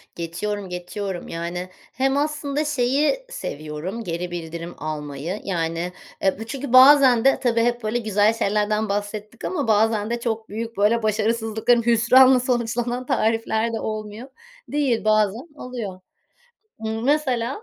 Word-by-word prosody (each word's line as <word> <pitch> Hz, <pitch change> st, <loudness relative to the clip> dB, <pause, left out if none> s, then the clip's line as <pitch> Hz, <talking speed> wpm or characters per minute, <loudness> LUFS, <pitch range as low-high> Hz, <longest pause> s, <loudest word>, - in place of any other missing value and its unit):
Geçiyorum, 190 Hz, +4 st, -4 dB
geçiyorum. 180 Hz, +1 st, -5 dB
Yani, 175 Hz, +2 st, -5 dB, 0.2 s
hem 270 Hz, +1 st, +1 dB
aslında 295 Hz, 0 st, -1 dB
şeyi 295 Hz, -, +1 dB
seviyorum, 180 Hz, -, -5 dB
geri 175 Hz, -1 st, -4 dB
bildirim 170 Hz, 0 st, -6 dB
almayı. 155 Hz, +4 st, -5 dB
Yani, 170 Hz, -1 st, -2 dB, 0.3 s
e, 190 Hz, +1 st, +1 dB
bu 225 Hz, -, -5 dB
çünkü 270 Hz, +1 st, -5 dB
bazen 260 Hz, -2 st, +7 dB
de 270 Hz, -, +4 dB
tabii 235 Hz, -2 st, +1 dB
hep 240 Hz, 0 st, 0 dB
böyle 220 Hz, +3 st, 0 dB
güzel 215 Hz, -1 st, +2 dB
şeylerden 210 Hz, 0 st, 0 dB
bahsettik 205 Hz, +2 st, -4 dB
ama 295 Hz, -9 st, -2 dB
bazen 220 Hz, 0 st, +2 dB
de 235 Hz, 0 st, -2 dB
çok 225 Hz, -2 st, -3 dB
büyük, 230 Hz, +1 st, -5 dB
böyle 215 Hz, +3 st, +2 dB
başarısızlıkların, 225 Hz, +2 st, +1 dB
hüsranla 250 Hz, +3 st, +6 dB
sonuçlanan 240 Hz, 0 st, -1 dB
tarifler 225 Hz, -2 st, 0 dB
de 225 Hz, -, -2 dB
olmuyor 215 Hz, +2 st, -5 dB, 0.4 s
değil. 280 Hz, -6 st, 0 dB
Bazen 215 Hz, -, +2 dB
oluyor. 235 Hz, -9 st, -6 dB, 0.9 s
Imm, 220 Hz, +1 st, -3 dB
mesela 270 Hz, -, 0 dB
225 Hz, 135 wpm, -23 LUFS, 200-245 Hz, 0.9 s, bazen